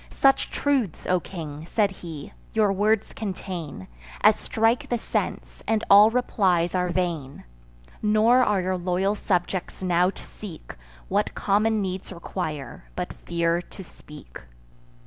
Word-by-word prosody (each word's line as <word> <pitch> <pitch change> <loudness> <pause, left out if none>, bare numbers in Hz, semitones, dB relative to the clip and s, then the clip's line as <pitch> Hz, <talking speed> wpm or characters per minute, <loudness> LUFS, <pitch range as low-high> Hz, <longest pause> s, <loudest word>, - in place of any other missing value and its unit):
"Such 270 0 +3
truths, 265 - 0
O 180 0 +2
king," 160 -3 -7
said 205 +1 +2
he, 165 -6 -9 0.2
"your 210 -3 +3
words 210 +2 +1
contain, 180 - -5 0.3
As 215 0 +6
strike 225 +2 0
the 240 - +1
sense, - - -3
and 220 -1 +1
all 205 +2 +9
replies 190 -8 +1
are 180 -1 +1
vain; 165 -6 -2 0.6
Nor 215 +4 +4
are 205 -6 +2
your 185 0 0
loyal 185 +3 +1
subjects 185 -2 -2
now 180 0 +3
to - - -9
seek 185 -7 -10 0.3
What - - 0
common 215 +1 +2
needs 190 0 -4
require, 155 -6 -5
but 180 0 -4
fear 170 0 -1
to 190 - -11
speak. 150 -3 -13
185 Hz, 135 wpm, -25 LUFS, 170-215 Hz, 0.6 s, all